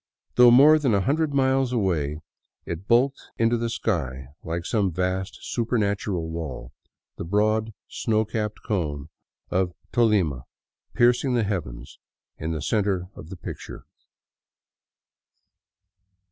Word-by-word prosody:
Though 125 Hz, 0 st, +7 dB
more 145 Hz, +6 st, +7 dB
than 130 Hz, -8 st, +2 dB
a 100 Hz, -, +2 dB
hundred 145 Hz, -, +1 dB
miles 135 Hz, -2 st, +2 dB
away, 80 Hz, -, -1 dB, 0.4 s
it 85 Hz, +4 st, -6 dB
bulked 130 Hz, +4 st, +3 dB, 0.2 s
into 115 Hz, +1 st, +2 dB
the 115 Hz, 0 st, -1 dB
sky 65 Hz, -, -2 dB
like 85 Hz, +1 st, -4 dB
some 100 Hz, -5 st, +1 dB
vast 95 Hz, +3 st, -2 dB
supernatural 100 Hz, -7 st, -1 dB
wall, 80 Hz, -7 st, -6 dB, 0.5 s
the -, -, -4 dB
broad 110 Hz, +4 st, +1 dB, 0.2 s
snow 110 Hz, -1 st, 0 dB
capped 105 Hz, 0 st, -4 dB
cone 75 Hz, -8 st, -2 dB, 0.4 s
of 90 Hz, -1 st, 0 dB, 0.2 s
Tolima 100 Hz, -, +2 dB, 0.5 s
piercing 125 Hz, +2 st, +3 dB
the 120 Hz, -, +2 dB
heavens 75 Hz, -, -5 dB, 0.4 s
in 80 Hz, -, -3 dB
the 80 Hz, -3 st, -3 dB
center 95 Hz, -3 st, 0 dB
of 80 Hz, -, -11 dB
the 95 Hz, -, -8 dB
picture. -, -, -8 dB
100 Hz, 120 wpm, -25 LUFS, 85-120 Hz, 0.5 s, Though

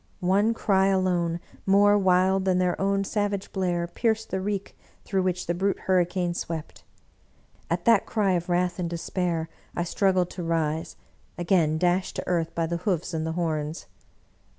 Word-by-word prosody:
One 200 Hz, +5 st, +2 dB
cry 195 Hz, -3 st, +2 dB
alone, 180 Hz, -3 st, +1 dB, 0.3 s
more 205 Hz, +1 st, +5 dB
wild 190 Hz, -1 st, +3 dB
than 185 Hz, -1 st, +2 dB
their 180 Hz, 0 st, 0 dB
own 195 Hz, 0 st, +1 dB
savage 205 Hz, -1 st, -2 dB
blare, 175 Hz, -3 st, 0 dB
pierced 220 Hz, +5 st, -1 dB
the 190 Hz, -, -1 dB
reek 200 Hz, 0 st, -3 dB, 0.3 s
through 195 Hz, -2 st, 0 dB
which 180 Hz, -1 st, -1 dB
the 175 Hz, -, 0 dB
Brute 195 Hz, +3 st, -1 dB
Hurricane 180 Hz, -1 st, +1 dB
swept. 165 Hz, -2 st, -6 dB, 0.9 s
At 170 Hz, +1 st, -1 dB
that 230 Hz, -4 st, +4 dB
cry 205 Hz, -4 st, +1 dB
of 175 Hz, -1 st, -1 dB
wrath 180 Hz, +1 st, +1 dB
and 175 Hz, -2 st, -1 dB
despair 170 Hz, -1 st, -2 dB, 0.3 s
I 175 Hz, -, 0 dB
struggled 185 Hz, 0 st, +1 dB
to 180 Hz, -, -6 dB
rise, 160 Hz, -1 st, -1 dB, 0.4 s
again 170 Hz, -3 st, +2 dB
dashed 180 Hz, +2 st, +1 dB
to -, -, -3 dB
earth 170 Hz, -2 st, -1 dB
by 165 Hz, -, +1 dB
the 170 Hz, +1 st, -2 dB
hoofs 180 Hz, -1 st, -2 dB
and 160 Hz, 0 st, -2 dB
the 160 Hz, -, -2 dB
horns. 160 Hz, -2 st, -2 dB
180 Hz, 165 wpm, -26 LUFS, 170-195 Hz, 0.9 s, more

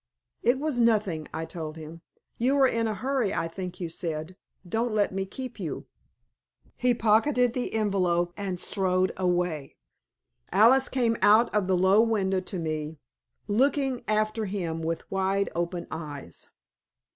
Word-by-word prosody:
"It 245 Hz, +2 st, +3 dB
was 290 Hz, -3 st, -2 dB
nothing," 210 Hz, -9 st, +2 dB
I 160 Hz, -, -4 dB
told 160 Hz, -1 st, -7 dB
him. 160 Hz, +1 st, -9 dB, 0.4 s
"You 260 Hz, +4 st, +2 dB
are 270 Hz, -, +6 dB
in 230 Hz, -2 st, 0 dB
a 215 Hz, -, -2 dB
hurry, 255 Hz, 0 st, -1 dB
I 165 Hz, -, -1 dB
think 180 Hz, +1 st, -7 dB
you 175 Hz, -, -3 dB
said. 165 Hz, 0 st, -4 dB, 0.3 s
Don't 225 Hz, +4 st, -1 dB
let 205 Hz, -2 st, +1 dB
me 195 Hz, 0 st, -2 dB
keep 255 Hz, +2 st, -7 dB
you." 165 Hz, -7 st, -4 dB, 0.9 s
He 250 Hz, -1 st, +2 dB
pocketed 235 Hz, +3 st, +3 dB
the 250 Hz, -1 st, -2 dB
envelope 180 Hz, -5 st, +1 dB
and 190 Hz, -3 st, -4 dB
strode 185 Hz, -1 st, +1 dB
away. 175 Hz, -5 st, -1 dB, 0.8 s
Alice 255 Hz, +6 st, +5 dB
came 235 Hz, -3 st, +1 dB
out 215 Hz, +3 st, +5 dB
of 205 Hz, -3 st, +1 dB
the 185 Hz, -1 st, +2 dB
low 190 Hz, +4 st, +5 dB
window 200 Hz, -5 st, +1 dB
to 185 Hz, +1 st, -6 dB
me, 155 Hz, -1 st, -3 dB, 0.5 s
looking 265 Hz, +3 st, +1 dB
after 215 Hz, +1 st, 0 dB
him 175 Hz, -5 st, -3 dB
with 165 Hz, 0 st, -4 dB
wide 195 Hz, +1 st, 0 dB
open 170 Hz, +1 st, -2 dB
eyes. 145 Hz, -, -7 dB
195 Hz, 150 wpm, -27 LUFS, 170-230 Hz, 0.9 s, are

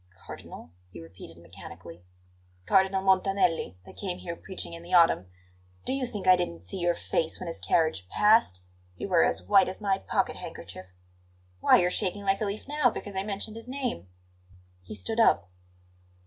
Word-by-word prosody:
"Cardinal?" 80 Hz, -, -10 dB, 0.2 s
he 90 Hz, -, -11 dB
repeated 80 Hz, 0 st, -12 dB
mechanically. 85 Hz, -1 st, -12 dB, 0.6 s
"Cardinal 190 Hz, -, +3 dB
Montanelli, 190 Hz, -, +2 dB
that -, -, -14 dB
came 185 Hz, -3 st, -3 dB
here 170 Hz, -1 st, -6 dB
preaching 185 Hz, -1 st, -7 dB
in 170 Hz, -, -8 dB
the 175 Hz, +2 st, -1 dB
autumn. 165 Hz, -, +5 dB, 0.6 s
Do -, -, -1 dB
you 270 Hz, -2 st, -1 dB
think 210 Hz, -5 st, -6 dB
I 185 Hz, 0 st, +8 dB
didn't 90 Hz, -, -4 dB
see 90 Hz, -, -5 dB
your 175 Hz, -1 st, +1 dB
face 160 Hz, -, -2 dB
when 185 Hz, -, -6 dB
his 165 Hz, -1 st, -5 dB
carriage 155 Hz, -, 0 dB
passed? 210 Hz, -, +3 dB, 0.3 s
You -, -, -4 dB
were 175 Hz, -3 st, +5 dB
as -, -, 0 dB
white 195 Hz, -2 st, +4 dB
as 185 Hz, -, -6 dB
my 195 Hz, -2 st, 0 dB
pocket -, -, -1 dB
handkerchief! 95 Hz, -, -9 dB, 0.7 s
Why, -, -, +6 dB
you're 180 Hz, 0 st, +2 dB
shaking 200 Hz, +1 st, -1 dB
like 195 Hz, +1 st, +1 dB
a -, -, +1 dB
leaf 205 Hz, +4 st, -5 dB
now 295 Hz, -3 st, +2 dB
because 205 Hz, -3 st, -7 dB
I 190 Hz, -, 0 dB
mentioned 205 Hz, +2 st, -5 dB
his 230 Hz, -, -10 dB
name!" 255 Hz, -, -4 dB, 0.7 s
He 90 Hz, -, -9 dB
stood 105 Hz, -, -3 dB
up. 85 Hz, -, +3 dB
185 Hz, 175 wpm, -28 LUFS, -, 0.7 s, I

